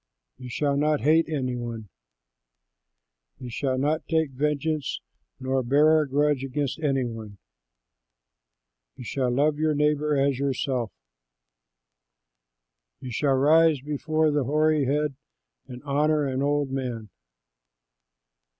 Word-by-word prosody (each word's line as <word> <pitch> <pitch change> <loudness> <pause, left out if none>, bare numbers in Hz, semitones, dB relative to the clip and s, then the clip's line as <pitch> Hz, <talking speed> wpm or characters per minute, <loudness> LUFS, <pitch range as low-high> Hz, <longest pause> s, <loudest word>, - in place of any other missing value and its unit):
You 125 -1 -8
shall 140 +3 0
not 150 0 +1
hate 160 +3 +3
any 130 -5 -2
one. 115 -3 -6 1.5
You 125 -1 -8
shall 130 +2 -1
not 150 +4 -1
take 160 -3 0
vengeance 150 +1 -2 0.4
nor 130 0 0
bear 150 +5 +4
a 150 - -4
grudge 145 0 +1
against 135 +2 -3
any 135 -4 0
one. 110 -3 -8 1.6
You - - -10
shall 130 +1 -1
love 145 +4 +1
your 155 -1 +1
neighbor 150 0 +1
as 135 -1 +1
yourself. 130 -4 -1 2.1
You 130 - -8
shall 135 +3 +1
rise 155 +1 +4
before 155 +2 0
the 145 -3 0
hoary 155 +1 +2
head 145 +2 0 0.5
and 125 +1 -10
honor 150 +1 +1
an 130 -1 -2
old 145 -1 0
man. 125 -5 -4
140 Hz, 120 wpm, -25 LUFS, 130-150 Hz, 2.1 s, bear